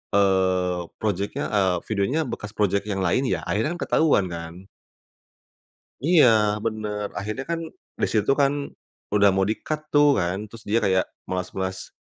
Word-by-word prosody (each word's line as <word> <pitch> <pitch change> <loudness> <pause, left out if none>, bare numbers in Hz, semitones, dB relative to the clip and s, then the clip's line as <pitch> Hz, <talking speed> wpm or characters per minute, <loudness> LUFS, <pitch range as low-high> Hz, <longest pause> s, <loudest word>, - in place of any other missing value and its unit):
eee, 95 -3 +2
project-nya, 100 -1 -1
eee, 95 -4 +2
videonya 110 +10 +1
bekas 105 -4 -6
project 100 -1 +1
yang 95 -1 -1
lain 125 +10 +2
ya, 85 -3 -1
akhirnya 110 - -1
kan - - -13
ketahuan 150 -11 +3
kan. 85 0 -6 1.5
Iya 170 -4 +6 0.4
benar, 105 -2 -2
akhirnya 105 +6 -3
kan 165 0 -1 0.4
di - - +4
situ 105 +3 +2
kan 140 0 +3 0.6
udah 100 -1 +6
mau 95 - +1
di-cut 155 +7 -3
tuh 145 0 +6
kan, 90 +2 -1
terus 110 +1 -11
dia 110 - +3
kayak 95 -1 +2 0.2
melas-melas 95 +1 -4
100 Hz, 145 wpm, -24 LUFS, 95-110 Hz, 1.5 s, Iya